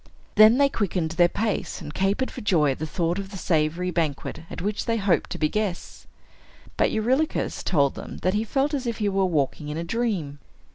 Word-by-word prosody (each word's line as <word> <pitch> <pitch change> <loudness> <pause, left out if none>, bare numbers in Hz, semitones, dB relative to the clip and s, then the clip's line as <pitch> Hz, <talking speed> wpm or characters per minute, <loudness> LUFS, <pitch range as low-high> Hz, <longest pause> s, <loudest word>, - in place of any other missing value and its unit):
Then 215 +3 +7
they 280 0 +5
quickened 185 -10 -1
their 175 +1 +4
pace, 215 +3 -2
and 150 -4 -8
capered 200 +9 0
for - - -8
joy 160 -8 +3
at 130 - -5
the 155 - -3
thought 170 +3 -1
of 195 -1 -6
the 195 - -8
savory 170 +1 0
banquet 155 -5 -2
at - - -7
which 205 +2 -2
they 230 0 +1
hoped 195 -4 +1
to - - -4
be 155 - +2
guests. 205 0 -4 0.7
But - - +2
Eurylochus 260 +8 0
told 140 -5 +2
them - - -8
that 185 - +2
he 210 +1 +1
felt 270 +6 0
as 265 -4 -2
if 235 - -2
he 210 -1 0
were 195 -1 +1
walking 150 -3 -1
in 150 - -4
a 165 - -2
dream. 175 -8 -2
190 Hz, 210 wpm, -25 LUFS, 160-220 Hz, 0.7 s, Then